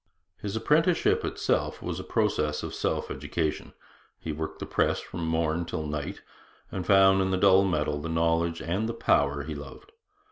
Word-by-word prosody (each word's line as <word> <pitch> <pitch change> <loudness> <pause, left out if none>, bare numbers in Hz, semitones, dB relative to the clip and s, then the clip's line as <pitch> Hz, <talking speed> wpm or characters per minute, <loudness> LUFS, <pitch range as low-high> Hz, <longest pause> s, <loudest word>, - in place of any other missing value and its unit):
His 100 0 -4
apprenticeship 155 +10 +2
itself - - -1
was - - -4
a - - -5
process 75 0 0
of - - -5
self - - -2
education. 80 -3 -3 0.5
He 80 - -4
worked 80 +1 -5
the - - -5
press - - +1
from 85 -2 -5
morn 80 +1 0
till 80 -2 -4
night, 75 -1 -4 0.5
and 90 - -4
found 95 -1 +6
in 95 - +1
the 95 - +1
dull 95 0 +6
metal 75 -5 0
the 85 - -4
knowledge 80 0 +1
and 95 +7 -1
the 115 - -3
power 70 -8 +2
he 80 +2 -5
loved. 75 - -10
85 Hz, 175 wpm, -27 LUFS, 75-95 Hz, 0.5 s, found